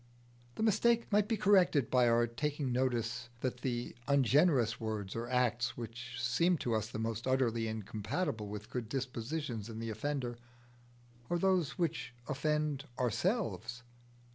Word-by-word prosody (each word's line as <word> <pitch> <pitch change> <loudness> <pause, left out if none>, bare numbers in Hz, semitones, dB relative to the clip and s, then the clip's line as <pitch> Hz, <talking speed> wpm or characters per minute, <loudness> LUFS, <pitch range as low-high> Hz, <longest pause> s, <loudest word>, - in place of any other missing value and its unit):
The - - -2
mistake 230 +2 +3
might 205 0 +4
be 225 -1 0
corrected 180 - +4
by 125 -1 +5
our 120 0 +4
taking 140 +3 -2
notice 120 -2 0
that 125 -1 -1
the 120 -2 -2
ungenerous 140 -2 +4
words 110 -3 -3
or 115 +1 -3
acts 125 -1 +1
which 115 0 -7
seem 125 +9 +2
to 120 -5 -1
us 110 -1 0
the 115 - -5
most 115 +1 -2
utterly 120 -3 +2
incompatible 110 - -3
with 105 +1 -7
good 120 -3 -3
dispositions 125 -2 -3
in 110 - -7
the 115 0 -3
offender, 120 +1 -3 0.9
are 175 - +2
those 180 -4 +2
which 150 -8 -2
offend 150 0 0
ourselves. 125 - -1
125 Hz, 140 wpm, -34 LUFS, 115-150 Hz, 0.9 s, by